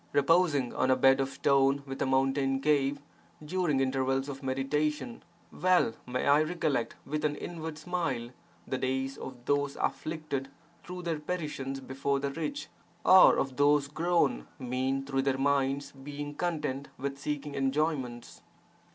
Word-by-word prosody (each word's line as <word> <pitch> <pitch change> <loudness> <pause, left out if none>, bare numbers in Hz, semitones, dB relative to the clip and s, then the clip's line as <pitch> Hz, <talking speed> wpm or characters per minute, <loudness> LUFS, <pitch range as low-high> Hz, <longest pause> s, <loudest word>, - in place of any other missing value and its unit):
Reposing 145 -3 +3
on 130 - +1
a 130 - +5
bed 135 +1 +5
of 135 - -1
stone 140 0 +2
within 135 0 -3
a - - -1
mountain 135 0 +2
cave, 140 -1 +2 0.5
during 165 -4 0
intervals 135 +1 0
of 135 0 -6
meditation, 150 - -1 0.3
(well) 180 -10 +3
may 125 +1 -2
I 145 +2 +5
recollect 155 -6 -1
with 150 +2 -3
an 150 -1 +1
inward 160 -1 -6
smile 155 -8 -2 0.3
the 130 - -3
days 130 +1 -1
of 125 -2 -9
those 145 -1 +1
afflicted 155 -4 -3 0.3
through 180 0 -7
their 165 -3 -2
petitions 150 -5 -4
before 140 +1 -1
the 140 0 -2
rich, 280 - -4 0.4
or 185 0 +8
of 135 -2 -2
those 145 0 +4
grown 160 - +1
mean 130 +2 -1
through 135 -1 0
their 135 -1 0
minds 140 0 +1
being 145 +1 -7
content 150 -5 -2
with 140 +1 -4
seeking 145 0 -4
enjoyments. 135 -3 -1
140 Hz, 145 wpm, -30 LUFS, 135-150 Hz, 0.5 s, or